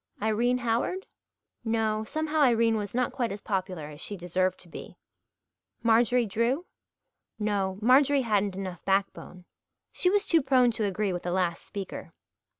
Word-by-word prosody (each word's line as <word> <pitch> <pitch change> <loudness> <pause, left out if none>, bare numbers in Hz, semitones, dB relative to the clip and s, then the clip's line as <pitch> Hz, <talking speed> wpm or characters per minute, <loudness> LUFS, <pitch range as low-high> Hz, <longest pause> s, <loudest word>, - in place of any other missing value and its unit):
Irene 225 +4 +1
Howard? 240 - -1 0.6
No, 220 -1 0
somehow 315 +5 -2
Irene 230 -4 +4
was 205 0 -4
not 250 0 +1
quite 240 -5 -2
as 200 - -5
popular 185 -5 -3
as 150 +1 -10
she 205 - -4
deserved 185 +1 -1
to 180 - -12
be. 165 - -10 0.9
Marjorie 235 +1 +3
Drew? 235 - 0 0.7
No, 200 -3 -1
Marjorie 270 +3 +5
hadn't 205 -4 0
enough 185 -2 -6
backbone. 195 -2 -2 0.5
She 360 - +2
was 410 +1 +2
too 330 -4 +3
prone 255 -2 +4
to 220 -1 -2
agree 200 0 -1
with 175 - -3
the 175 - -3
last 175 -2 -1
speaker. 200 -2 -7
215 Hz, 150 wpm, -28 LUFS, 190-245 Hz, 0.9 s, Marjorie